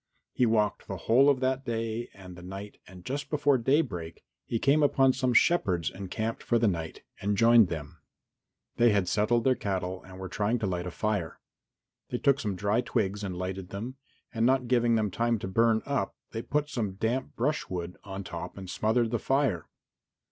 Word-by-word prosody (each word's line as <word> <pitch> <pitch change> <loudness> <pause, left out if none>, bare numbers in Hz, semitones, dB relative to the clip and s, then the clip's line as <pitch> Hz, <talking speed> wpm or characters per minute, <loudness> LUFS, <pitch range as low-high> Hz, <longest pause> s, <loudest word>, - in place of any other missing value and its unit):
He 125 - +2
walked 110 -2 +1
the - - -4
whole 135 +5 +4
of 135 -2 +2
that 130 +1 0
day 115 -1 -3
and 95 -2 -11
the 90 - -11
night 95 +3 -8
and 90 -1 -13
just 140 +2 -4
before 145 -3 +2
daybreak 110 - 0 0.2
he 115 - 0
came 140 +6 +3
upon 135 -2 +4
some 130 -1 0
shepherds 95 - +3
encamped 110 +4 -4
for 120 - +1
the 115 -1 +3
night, 85 -4 -3 0.2
and 100 +1 0
joined 115 -1 +6
them. 80 -4 -6 0.8
They 120 0 +5
had 100 -3 +1
settled 110 +5 +2
their 130 - +4
cattle 95 -4 -3
and 95 0 -12
were 95 0 -6
trying 105 +6 0
to 110 - -2
light 90 -2 -2
a - - -2
fire. 105 -2 -2 0.7
They 125 - -2
took 140 +1 +3
some 105 -7 -2
dry 100 +5 +1
twigs 100 -3 -1
and 95 -3 -4
lighted 95 0 -4
them, 115 +7 -6 0.4
and 115 -1 0
not 130 0 +3
giving 120 -1 +3
them 105 -3 0
time 115 +3 +1
to 100 - -5
burn 115 +3 +2
up, 140 -1 -1 0.2
they 115 - -4
put 150 +4 -1
some 110 -9 -3
damp 115 +6 -2
brushwood 90 - -2
on 100 0 -6
top - - -7
and 95 -1 -7
smothered 110 +4 +1
the 120 - 0
fire. 135 - 0
110 Hz, 190 wpm, -28 LUFS, 95-125 Hz, 0.8 s, joined